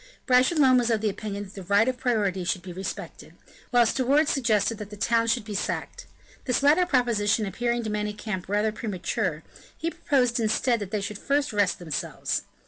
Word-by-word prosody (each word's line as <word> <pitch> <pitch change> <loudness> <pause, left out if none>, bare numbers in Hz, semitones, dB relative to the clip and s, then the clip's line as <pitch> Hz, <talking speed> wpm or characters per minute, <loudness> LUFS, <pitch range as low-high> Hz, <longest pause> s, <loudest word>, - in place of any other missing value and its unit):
Bragelonne 255 0 +4
was 240 -1 0
of 225 -2 +1
the 215 -2 +1
opinion 205 0 -5
that 200 -1 -12
the 195 - -8
right 200 +5 +3
of 255 -1 -1
priority 205 -7 0
should 180 0 -2
be 180 -1 -8
respected, 190 +2 -7 0.3
while 245 -1 +4
De 260 +3 0
Wardes 285 +4 +3
suggested 225 -4 +1
that 210 -1 -7
the 210 - -10
town 230 +2 +2
should 230 -1 +1
be 215 - -6
sacked. 200 - -4 0.4
This 255 +1 0
latter 315 +6 +5
proposition 230 -7 +2
appearing 240 +4 -1
to 220 - -3
Manicamp 210 -2 -4
rather 210 +2 +1
premature, 185 -6 -3 0.3
he 330 +1 -2
proposed 250 -6 +1
instead 230 +2 +1
that 205 -3 -5
they 210 0 -2
should 205 +1 -5
first 285 -2 0
rest 205 -3 +2
themselves. 160 -5 -3
220 Hz, 190 wpm, -26 LUFS, 205-250 Hz, 0.4 s, latter